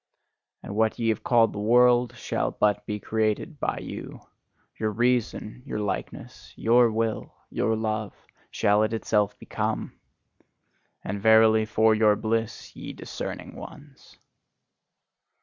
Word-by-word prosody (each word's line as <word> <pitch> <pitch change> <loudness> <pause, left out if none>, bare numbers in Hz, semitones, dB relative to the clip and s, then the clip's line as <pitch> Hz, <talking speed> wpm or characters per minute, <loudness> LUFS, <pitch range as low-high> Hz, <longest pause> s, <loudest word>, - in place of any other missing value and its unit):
And - - -7
what 110 0 +1
ye 115 -2 0
have 110 -1 0
called 115 -2 +3
the 105 - -5
world 120 +2 +4
shall - - -2
but 105 0 0
be 105 -1 -3
created 110 - -1
by - - -1
you: - - -8 0.6
your 110 - 0
reason, 120 0 -1
your 135 - -5
likeness, 105 -1 -5
your 120 +1 +4
will, 110 0 -2 0.2
your 110 - 0
love, 110 -2 -3 0.3
shall 105 +1 +2
it 110 +1 0
itself 105 -2 0
become! - - -3 1.1
And 100 +1 -4
verily, 110 0 +5
for 110 0 +3
your 105 -1 +4
bliss, 115 +1 -3
ye - - -7
discerning - - -7
ones! 145 -2 -13
110 Hz, 130 wpm, -26 LUFS, 105-115 Hz, 1.1 s, verily